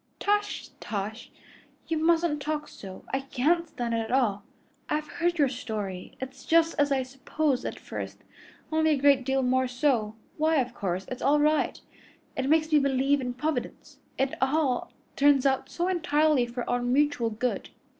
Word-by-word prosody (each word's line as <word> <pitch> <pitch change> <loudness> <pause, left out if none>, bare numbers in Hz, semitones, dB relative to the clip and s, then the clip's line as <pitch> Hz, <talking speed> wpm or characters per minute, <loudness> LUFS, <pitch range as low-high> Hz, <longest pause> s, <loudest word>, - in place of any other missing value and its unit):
"Tush, 415 0 0
tush! 215 +1 -5 0.6
You 325 -1 0
mustn't 325 -2 +2
talk 300 +1 -2
so. 190 -2 -10
I 270 - +2
can't 290 +6 +1
stand 240 -4 -3
it 230 - +1
at 225 +1 -4
all. 230 -6 +2 0.5
I've 300 0 0
heard 345 +3 -1
your 290 -3 +4
story. 215 -7 -5
It's 260 0 -7
just 330 0 +3
as 290 0 +3
I 265 -1 +2
supposed 270 +1 -1
at - - -4
first, - - -7 0.5
only 315 0 +3
a - - -2
great 275 -1 +4
deal 265 +1 +1
more 260 +1 +2
so. 245 -4 0 0.2
Why, 315 +1 +2
of 250 -4 +1
course 190 -4 -3
it's 255 - -6
all 290 +2 +4
right. 305 +1 +2 0.6
It 265 +1 -1
makes 315 0 +3
me 300 - +7
believe 275 0 +2
in 250 -1 -3
Providence, 300 +4 -4 0.2
it 270 0 0
all 265 -1 +1 0.2
turns 280 -1 +4
out 265 -1 +1
so 350 +1 -1
entirely 310 -7 +2
for 240 +1 -5
our 245 - 0
mutual 255 -1 +2
good. 225 +3 -2
270 Hz, 170 wpm, -27 LUFS, 245-310 Hz, 0.6 s, me